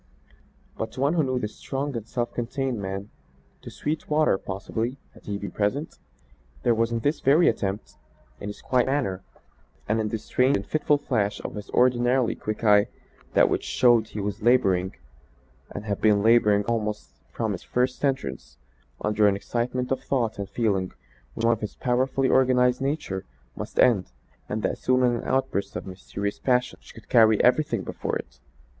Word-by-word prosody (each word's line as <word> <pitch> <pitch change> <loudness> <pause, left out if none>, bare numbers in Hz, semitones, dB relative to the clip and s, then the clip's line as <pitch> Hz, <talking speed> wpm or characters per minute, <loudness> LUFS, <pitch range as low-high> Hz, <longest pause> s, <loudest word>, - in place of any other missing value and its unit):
But - - -3
to - - -9
one 140 +4 +2
who 170 - +2
knew 130 -3 0
the 110 - -1
strong 135 +5 -4
and 115 -1 -5
self 120 -1 -3
contained 125 -1 -2
man 95 +2 -5 0.5
to - - -9
Sweetwater 150 -6 0
possibly, 110 +6 -4 0.2
had - - -18
he 100 -1 -2
been 100 0 -6
present, 120 +10 -2 0.6
there 120 - +4
was 115 +1 +1
in 115 -1 -1
this 145 +5 0
very 150 +6 +4
attempt 95 - -2 0.4
in 105 - -5
his 105 - -9
quiet 125 -1 +2
manner 130 -9 -1 0.7
and 110 +2 +1
in 110 -1 -1
the 110 - -2
strange 125 +5 +1
and 100 - -6
fitful 150 +2 +2
flash 110 -8 -1
of - - -6
his 105 -1 -8
ordinarily 125 0 +3
quick 110 +2 -5
eye, 105 -1 +5 0.5
that - - +6
which - - -1
showed 120 -3 +3
he 105 - -7
was 100 +2 -3
labouring 95 - +3 0.7
and 100 - -7
had 100 -2 -3
been 105 -2 +4
labouring 105 -3 +4
almost 110 -2 -2 0.2
from - - -2
his - - -4
first 125 +2 -1
entrance, 135 - -2 0.4
under 105 0 +3
an 100 - +3
excitement 125 +5 -2
of 135 - 0
thought 115 -6 -1
and 100 -1 -4
feeling 100 -6 0 0.4
which 115 - -4
in - - +4
one - - +5
of 110 - -15
his 105 - -5
powerfully 130 +2 +1
organised 125 -1 +3
nature 135 -9 -2 0.3
must - - -7
end 105 - +4 0.4
and 105 0 -3
that - - -1
soon 130 0 +2
in 120 -1 +3
an - - -6
outburst 130 -6 -1
of - - -5
mysterious 100 +2 -5
passion 125 -1 +1
which - - -16
would 115 - -14
carry 110 -3 +5
everything 125 +5 +2
before - - -4
it. - - -7
115 Hz, 180 wpm, -25 LUFS, 105-130 Hz, 0.7 s, that